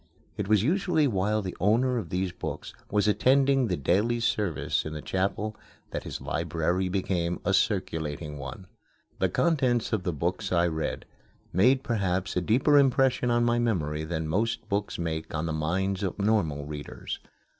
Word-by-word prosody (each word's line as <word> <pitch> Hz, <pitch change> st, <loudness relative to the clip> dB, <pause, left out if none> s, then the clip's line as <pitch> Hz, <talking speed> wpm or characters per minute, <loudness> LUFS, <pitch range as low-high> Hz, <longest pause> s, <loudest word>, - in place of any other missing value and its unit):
It 105 Hz, -3 st, -3 dB
was 105 Hz, -1 st, +4 dB
usually 170 Hz, -, +2 dB
while 105 Hz, -2 st, +1 dB
the 95 Hz, -, -5 dB
owner 120 Hz, +5 st, +2 dB
of 90 Hz, -7 st, -6 dB
these 90 Hz, +1 st, -1 dB
books -, -, -6 dB, 0.2 s
was 105 Hz, 0 st, +2 dB
attending 135 Hz, +3 st, +3 dB
the 90 Hz, -4 st, -1 dB
daily 105 Hz, -, +1 dB
service 90 Hz, -11 st, 0 dB
in 80 Hz, -, -5 dB
the 75 Hz, -, -5 dB
chapel 100 Hz, +3 st, -1 dB, 0.4 s
that -, -, -4 dB
his -, -, -5 dB
library 90 Hz, +3 st, -1 dB
became 90 Hz, -2 st, -1 dB
a 95 Hz, -, +2 dB
circulating 80 Hz, -8 st, -1 dB
one. 80 Hz, +8 st, -7 dB, 0.5 s
The -, -, +2 dB
contents 130 Hz, -9 st, +1 dB
of 110 Hz, -, +1 dB
the 90 Hz, -, -1 dB
books 90 Hz, +6 st, -2 dB
I 85 Hz, -1 st, +3 dB
read 80 Hz, -2 st, -2 dB, 0.5 s
made 130 Hz, +9 st, +4 dB
perhaps 95 Hz, -5 st, -1 dB
a 90 Hz, -, +2 dB
deeper 130 Hz, -, +4 dB
impression 130 Hz, -2 st, +3 dB
on 120 Hz, 0 st, +3 dB
my 120 Hz, 0 st, +2 dB
memory 80 Hz, -10 st, 0 dB
than 80 Hz, 0 st, -3 dB
most 115 Hz, +8 st, -1 dB
books 100 Hz, -1 st, -1 dB
make 80 Hz, -2 st, -3 dB
on 80 Hz, +1 st, -1 dB
the 80 Hz, -, -2 dB
minds 95 Hz, +5 st, -1 dB
of 95 Hz, -3 st, -2 dB
normal 100 Hz, -9 st, +1 dB
readers. 75 Hz, 0 st, -6 dB
95 Hz, 165 wpm, -27 LUFS, 85-115 Hz, 0.5 s, was